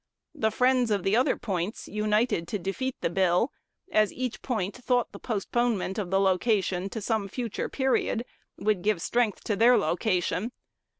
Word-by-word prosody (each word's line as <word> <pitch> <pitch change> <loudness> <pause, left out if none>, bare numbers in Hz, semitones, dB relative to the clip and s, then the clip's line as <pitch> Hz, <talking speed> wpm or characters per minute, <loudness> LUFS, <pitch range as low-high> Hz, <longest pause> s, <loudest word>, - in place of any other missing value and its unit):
The 220 - +1
friends 250 +1 +2
of 200 -3 +1
the 195 +2 +2
other 250 +3 +3
points 190 -1 -3
united 210 -3 +1
to 210 - -2
defeat 225 +8 -3
the - - +1
bill, 185 +6 +2 0.4
as 215 -1 +3
each 255 -2 -4
point 210 -6 -2
thought 245 -1 0
the - - -10
postponement 220 -2 -1
of 190 -4 -3
the 195 +1 +2
location 195 -1 +1
to 220 - -5
some 215 -1 -1
future 235 +2 -4
period 265 -3 0 0.3
would 210 -4 +1
give 205 -2 +1
strength 230 +3 0
to 210 - 0
their 235 +4 +6
location. 185 +6 0
215 Hz, 165 wpm, -27 LUFS, 195-240 Hz, 0.4 s, their